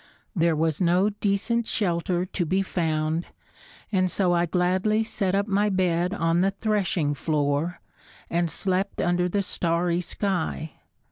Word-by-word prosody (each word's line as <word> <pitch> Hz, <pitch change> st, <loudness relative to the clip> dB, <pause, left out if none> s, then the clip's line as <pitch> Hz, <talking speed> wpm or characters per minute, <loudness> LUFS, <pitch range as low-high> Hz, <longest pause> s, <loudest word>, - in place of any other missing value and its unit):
There 165 Hz, -2 st, +2 dB
was 160 Hz, +1 st, 0 dB
no 180 Hz, +3 st, +3 dB
decent 210 Hz, +3 st, 0 dB
shelter 175 Hz, -2 st, 0 dB
to 185 Hz, 0 st, -2 dB
be 190 Hz, +4 st, +1 dB
found 160 Hz, -2 st, -1 dB, 0.6 s
and 185 Hz, -2 st, +2 dB
so 180 Hz, -1 st, +1 dB
I 175 Hz, 0 st, +2 dB
gladly 185 Hz, +5 st, +1 dB
set 195 Hz, -3 st, -1 dB
up 200 Hz, 0 st, +1 dB
my 205 Hz, +1 st, +2 dB
bed 180 Hz, -2 st, +1 dB
on 165 Hz, -3 st, +1 dB
the 195 Hz, -, +3 dB
threshing 195 Hz, -7 st, 0 dB
floor, 145 Hz, +3 st, -1 dB, 0.5 s
and 170 Hz, 0 st, 0 dB
slept 190 Hz, +3 st, -1 dB
under 175 Hz, +1 st, +1 dB
the 200 Hz, +2 st, 0 dB
starry 170 Hz, -1 st, 0 dB
sky. 180 Hz, -4 st, -2 dB
180 Hz, 140 wpm, -25 LUFS, 170-195 Hz, 0.6 s, no